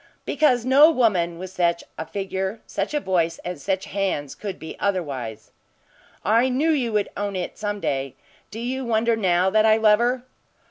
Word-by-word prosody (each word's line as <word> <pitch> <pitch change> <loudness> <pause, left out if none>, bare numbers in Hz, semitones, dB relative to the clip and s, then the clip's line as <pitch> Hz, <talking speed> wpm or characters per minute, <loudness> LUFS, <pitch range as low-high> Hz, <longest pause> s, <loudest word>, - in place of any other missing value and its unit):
"Because 250 -6 +2
no 280 +4 +7
woman 190 - +1
with 185 +1 -7
such 170 -2 0
a 160 - -6
figure, 190 +1 -3
such - - -3
a - - +2
voice 170 - 0
and 175 -4 -5
such 190 +2 -1
hands 185 -8 -2
could 200 -3 -6
be 160 - -8
otherwise." 135 - -3 0.7
"I 230 +6 +4
knew 285 +6 +2
you 255 -7 0
would 210 -1 +1
own 205 -1 -3
it 180 -1 -4
some 205 -1 -2
day. 135 -6 -2 0.3
Do 215 - -8
you 255 +3 -3
wonder 230 -1 +1
now 185 -3 +2
that 215 +1 +4
I 220 0 +5
love 215 -1 +5
her?" 245 +1 0
200 Hz, 180 wpm, -23 LUFS, 175-235 Hz, 0.7 s, no